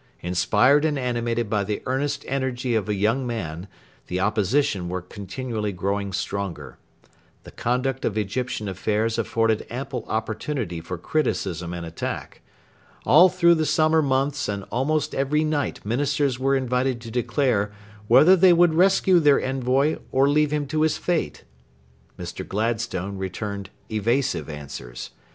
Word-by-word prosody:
Inspired 105 - +3
and 155 -2 +1
animated 120 -2 -1
by 105 -1 0
the 105 +1 -4
earnest 140 +2 -2
energy 130 -2 -1
of 105 -3 0
a 105 - +1
young 115 +6 +1
man, 90 -6 -4 0.4
the 90 - -2
Opposition 100 -1 +1
were 90 0 -3
continually 105 +3 -4
growing 100 +2 -2
stronger. 100 -1 -4 0.6
The - - -12
conduct 125 +2 -1
of 110 - -1
Egyptian 110 +1 -2
affairs 110 +4 -1
afforded 115 -1 +1
ample 130 -1 -4
opportunity 110 - -3
for 90 +2 -6
criticism 90 - -2
and 85 -1 -5
attack. 80 0 -6 0.6
All 170 +7 +7
through 170 -1 +4
the 160 -2 +1
summer 155 0 +3
months 140 0 0
and 100 -1 -3
almost 145 +7 0
every 145 +3 +1
night 150 -7 -2
Ministers 135 +2 0
were 135 +1 +2
invited 130 -1 0
to 115 -1 -8
declare 120 -3 0 0.4
whether 155 - +7
they 185 -1 +6
would 170 -1 +4
rescue 185 +1 +4
their 145 -3 +5
envoy 135 +3 +1
or 135 +1 +3
leave 150 +1 +3
him 150 -1 -1
to 155 +3 -1
his 155 -1 +2
fate. 175 -3 -2 0.7
Mr. - - -6
Gladstone 100 -3 -2
returned 100 +1 -5 0.2
evasive 115 0 0
answers. 70 -5 -8
120 Hz, 140 wpm, -24 LUFS, 100-140 Hz, 0.7 s, All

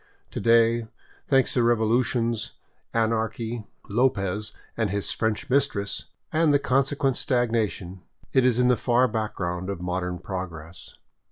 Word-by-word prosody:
To - - -4
day, 115 0 +4 0.4
thanks 135 -2 +3
to 125 - +2
revolutions, 115 0 +1 0.4
anarchy, 115 0 -1 0.2
Lopez 105 -3 +1 0.2
and 110 -3 0
his 100 +1 -2
French 110 +4 -1
mistress, 130 -7 0 0.3
and 160 -1 +4
the 145 - +5
consequent 135 -1 +1
stagnation, 110 -7 -1 0.3
it 130 - +5
is 125 -2 +3
in 125 0 +4
the 125 -1 +4
far 125 +1 +3
background 95 -5 -3
of 100 -3 -3
modern 90 0 -2
prog 90 0 -5
ress. 80 +2 -11
115 Hz, 135 wpm, -25 LUFS, 100-125 Hz, 0.4 s, the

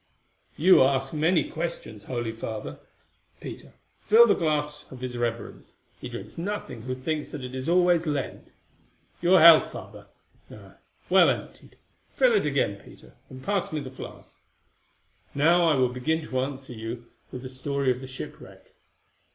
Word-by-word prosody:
"You 185 +5 +6
ask 135 +1 +2
many 160 +3 +2
questions, 110 -11 -6
holy 120 -3 -3
Father. 110 -9 -6 0.6
Peter, - - -9 0.3
fill 225 +2 +6
the 225 - +4
glass 150 -2 -2
of 130 -1 -10
his 125 -1 -5
reverence; 120 -1 -4 0.2
he - - -7
drinks - - -8
nothing 170 - -5
who 130 +2 -4
thinks 150 +4 -3
that 145 - -7
it 125 0 -7
is 130 +4 -4
always 175 -1 +3
Lent. 145 -3 -4 0.7
Your 180 +2 +5
health, 165 0 +8
Father. - - -10 0.4
Ah! - - -14 0.3
well - - +6
emptied. - - -5 0.4
Fill - - +4
it 420 - +2
again, - - 0
Peter, - - -16 0.2
and 130 0 -11
pass 200 +1 -1
me 155 - -2
the 135 -3 -7
flask. 130 - -11 1.0
Now 170 +5 +4
I 155 - +3
will 130 -2 +2
begin 155 +6 -1
to 130 - -2
answer 135 -1 -4
you 115 +1 -7 0.3
with 125 0 -7
the - - -5
story 135 +1 -1
of 125 +1 -4
the 130 - -8
shipwreck." 130 0 -10
140 Hz, 160 wpm, -26 LUFS, 125-165 Hz, 1.0 s, health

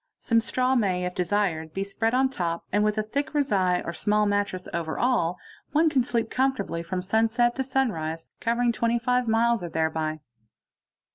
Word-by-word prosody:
Some 230 -1 +2
straw 255 +3 0
may 190 -7 +1
if 180 - -3
desired 180 -4 -1
be 195 - -1
spread 225 +4 -1
on 265 +1 +3
top, 170 -8 -3
and 205 +2 +2
with 210 0 +1
a 215 - +1
thick 280 +8 -3
rezai 190 -11 +2
or 170 - -4
small 210 +3 +1
mattress 205 -2 -1
over 165 -2 -3
all, 180 -9 +1 0.4
one 315 +1 +4
can 265 -4 +3
sleep 235 -2 -1
com 265 +1 +2
fortably 190 -7 -4
from 180 +2 -3
sunset 225 +4 +2
to 265 - 0
sunrise, 165 -12 -1
covering 235 +1 +1
25 235 +2 +1
miles 230 0 +2
or 175 - -5
thereby. 160 -1 -1
210 Hz, 180 wpm, -26 LUFS, 180-245 Hz, 0.4 s, one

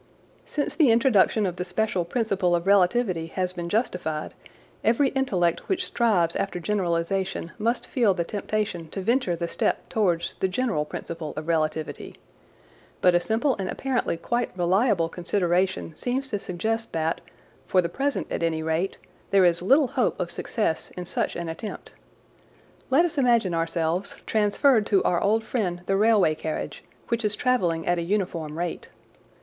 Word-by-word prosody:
Since 290 - -2
the 305 -6 +5
introduction 225 -3 +4
of 180 -1 -3
the - - -2
special 185 0 -1
principle 195 -3 +1
of 170 0 -2
relativity 195 -3 +3
has 185 -1 -1
been 175 -1 -5
justified, 175 -8 -2 0.5
every 250 +5 +3
intellect 185 -12 0
which 380 - 0
strives 190 -9 +2
after 195 -2 -2
generalisation 180 -1 -1
must 230 +3 0
feel 225 -7 +2
the 170 - 0
temptation 205 -3 -3
to 195 - -5
venture 230 -3 +1
the 170 0 -3
step - - -1
towards 175 -6 +1
the 190 - +2
general 190 -6 -1
principle 160 0 -6
of 155 +1 -5
relativity. 155 -2 -2 0.8
But 180 - +4
a 175 - +5
simple 225 +8 +1
and 190 -1 -2
apparently 260 -9 -1
quite 240 +6 -1
reliable 185 0 +2
consideration 175 -1 0
seems 265 - -2
to 205 -5 -2
suggest 225 +6 -3
that, 160 0 -1 0.5
for 185 - +3
the 175 - +2
present 275 +10 -1
at - - -2
any 160 -1 0
rate, 160 +4 -1 0.3
there 195 -2 +5
is 170 -1 +3
little 270 - +4
hope 260 -4 0
of 175 -1 -2
success 190 -3 -2
in 180 - -4
such - - -1
an 170 -1 -4
attempt; 165 +6 -7 1.0
Let 285 +6 +5
us 310 -4 -2
imagine 235 -8 +3
ourselves 165 +2 -1
transferred 215 +2 +3
to 195 -3 +3
our 175 - +1
old 220 +3 +2
friend 185 -8 -2
the 195 - +1
railway 210 -5 +4
carriage, 155 0 -5 0.3
which 235 0 0
is 210 -1 +1
travelling 180 -11 +1
at 175 0 +1
a - - -1
uniform 170 -4 -2
rate. 175 0 -4
190 Hz, 160 wpm, -25 LUFS, 170-225 Hz, 1.0 s, the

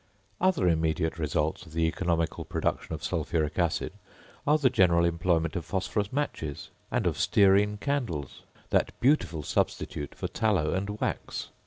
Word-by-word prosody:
Other 185 - +3
immediate 80 0 +1
results 75 +3 -1
of 80 - -14
the 80 0 +1
economical 85 -1 0
production - - -2
of - - -10
sulphuric 80 +1 -1
acid, 85 -3 0 0.5
are 150 +1 +5
the 135 -5 +3
general 85 -2 +4
employment 85 0 +1
of 90 - -2
phosphorus 95 +3 -2
matches, 80 - -3 0.2
and - - 0
of - - 0
stearine 100 +1 +4
candles, 115 - -3 0.3
that - - +1
beautiful 90 - +2
substitute 75 0 -2
for - - -3
tallow 100 -9 +1
and 100 +3 -3
wax. - - -3
85 Hz, 145 wpm, -28 LUFS, 80-105 Hz, 0.5 s, are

